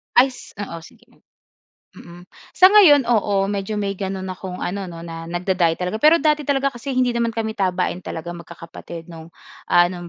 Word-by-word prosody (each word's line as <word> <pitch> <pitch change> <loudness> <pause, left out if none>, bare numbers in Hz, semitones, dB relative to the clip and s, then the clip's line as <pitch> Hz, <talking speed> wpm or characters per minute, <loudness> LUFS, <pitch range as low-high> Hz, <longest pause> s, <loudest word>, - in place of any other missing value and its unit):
Ay 260 +2 +6
s 250 - -14
oo, 200 -5 -6
sige. 165 - -18 0.8
Mm. 175 +1 -13 0.3
Sa 370 - +7
ngayon 355 -9 +7
oo, 205 -4 +1
medyo 200 +1 -3
may 200 -1 -2
gano'n 190 -1 -4
akong 185 0 -7
ano 195 +2 -3
'no 165 -1 -9
na 165 -1 -8
nagda-diet 175 -1 0
talaga. 180 +4 -3
Pero 315 +2 +6
dati 305 -1 +2
talaga 275 -1 0
kasi 240 +4 -6
hindi 255 -1 +1
naman 235 -1 0
kami 220 -1 -3
tabain 185 -2 -1
talaga 165 0 -6
magkakapatid 170 -1 -10
'no, 165 -1 -11 0.4
ah 175 0 +6
no'ng 175 -1 -7
190 Hz, 180 wpm, -21 LUFS, 175-235 Hz, 0.8 s, Sa